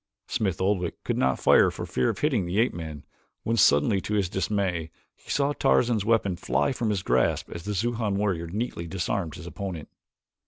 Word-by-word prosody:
Smith 95 -6 -1
Oldwick 95 -2 -1
could - - -1
not 65 0 +1
fire - - +5
for - - -6
fear 65 - 0
of - - -2
hitting 125 - +1
the 90 +3 -2
ape 120 +3 +3
man 80 -3 -7 0.4
when 115 - 0
suddenly 95 0 +4
to 105 - -2
his 100 -4 +1
dismay 95 -4 -1 0.3
he - - -21
saw 140 0 +1
Tarzan's 115 -6 +2
weapon 110 -4 +2
fly 65 +1 0
from 120 -4 -1
his 100 -4 -1
grasp 65 0 +1
as 85 +1 -7
the 105 0 -2
Xujan 110 0 -1
warrior 95 -5 -1
neatly 95 -2 -4
disarmed 90 -2 -2
his 85 - -9
opponent. 85 -2 -6
95 Hz, 190 wpm, -26 LUFS, 85-110 Hz, 0.4 s, fire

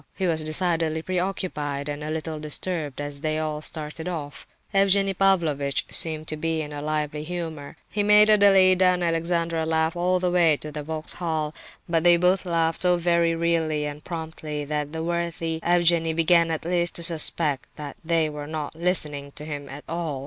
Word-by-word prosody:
He 190 - -2
was 160 -3 0
decidedly 160 -1 0
preoccupied 175 -6 -2
and 145 0 -4
a 150 - -4
little 155 0 -4
disturbed 150 -1 -2
as 145 -1 -5
they 155 -1 -1
all 155 -1 -2
started 155 +1 -4
off. 150 -5 -6 0.3
Evgenie 195 0 +4
Pavlovitch 165 -8 +1
seemed 155 -1 0
to 155 - 0
be 160 0 -1
in 150 0 -8
a 145 - -5
lively 150 0 -2
humour. 160 -4 -6
He 210 - -2
made 210 +1 +6
Adelaida 195 -3 +5
and 180 -1 +3
Alexandra 165 0 0
laugh 160 +1 0
all 180 +1 +1
the 180 -1 0
way 170 -4 +4
to 150 - -8
the 150 0 -5
Vauxhall; 155 0 -3 0.3
but 165 -2 +1
they 175 -1 +6
both 180 +2 +2
laughed 165 -1 +1
so 180 0 +4
very 170 -1 +2
readily 165 -2 0
and 150 +1 -6
promptly 160 -3 -5
that 150 0 -3
the 160 0 -4
worthy 170 -1 -2
Evgenie 170 -1 +3
began 165 +1 +4
at 160 -1 -3
last 175 0 0
to 170 - -4
suspect 155 -3 0
that 145 -2 -7
they 165 -1 +1
were 150 -1 -6
not 155 -1 -4
listening 155 -4 0
to 150 - -7
him 145 -2 -6
at 140 +3 -8
all. 165 -4 -3
160 Hz, 180 wpm, -25 LUFS, 150-175 Hz, 0.3 s, made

